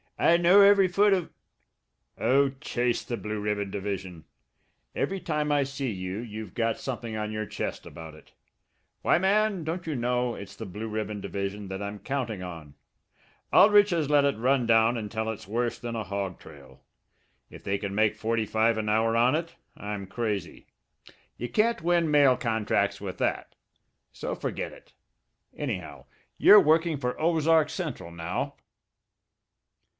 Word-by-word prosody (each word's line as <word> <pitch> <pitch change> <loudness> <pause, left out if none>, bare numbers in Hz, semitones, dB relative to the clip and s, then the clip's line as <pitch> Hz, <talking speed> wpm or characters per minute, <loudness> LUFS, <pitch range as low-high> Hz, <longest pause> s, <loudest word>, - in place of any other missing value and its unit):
I 170 - +4
know 175 +4 +6
every 200 -1 +6
foot 200 +3 +3
o' 180 -3 -1 0.4
" - - -51
"Oh, 140 +2 +3
chase 120 -4 -1
the 120 - -4
Blue 105 0 -4
Ribbon 105 -1 -2
division! 95 -4 -5 0.7
Every 195 0 -1
time 150 -3 -1
I 145 -1 +3
see 135 -2 -4
you 95 -1 -5
you've 110 -4 -7
got 115 -1 0
something 120 -4 -5
on 105 0 -3
your 110 -1 -4
chest - - -5
about 80 -1 -10
it. 80 - -17 0.7
Why, - - +3
man, 200 0 +1
don't 170 +3 -4
you 155 - -2
know 125 0 0
it's 100 -1 -10
the 110 - -7
Blue 105 +5 -6
Ribbon 105 -1 -4
division 100 0 -4
that 95 +1 -5
I'm 100 +1 -5
counting 120 -8 -3
on! 80 -5 -9 0.8
Aldrich 205 0 +6
has 160 -4 0
let 145 -1 +5
it 140 -5 +1
run 125 +1 +1
down 115 +1 +4
until 110 0 -3
it's 110 -4 -6
worse 120 +3 -2
than 120 -1 -5
a 110 - -2
hog 100 -3 -4
trail. - - -15 0.7
If - - -13
they 100 0 -1
can 100 -1 -4
make 110 0 +2
forty 115 0 -1
five 110 +2 +1
an 110 -1 -2
hour 115 +1 +2
on 120 +3 +4
it, 165 +2 -3 0.2
I'm 105 -1 -5
crazy. 100 -4 -4 0.7
You 120 - -5
can't 220 - +1
win 170 -1 +2
mail 140 -4 +5
contracts 105 -3 0
with 95 -3 -6
that. - - -2 0.6
So - - -5
forget - - -4
it. - - -17 0.6
Anyhow, - - -5 0.3
you're 210 - +9
working 160 -1 +3
for 125 -2 -2
the - - -16
Ozark 160 -1 +3
Central 145 - -5
now." 85 +1 -4
115 Hz, 165 wpm, -27 LUFS, 105-150 Hz, 0.8 s, you're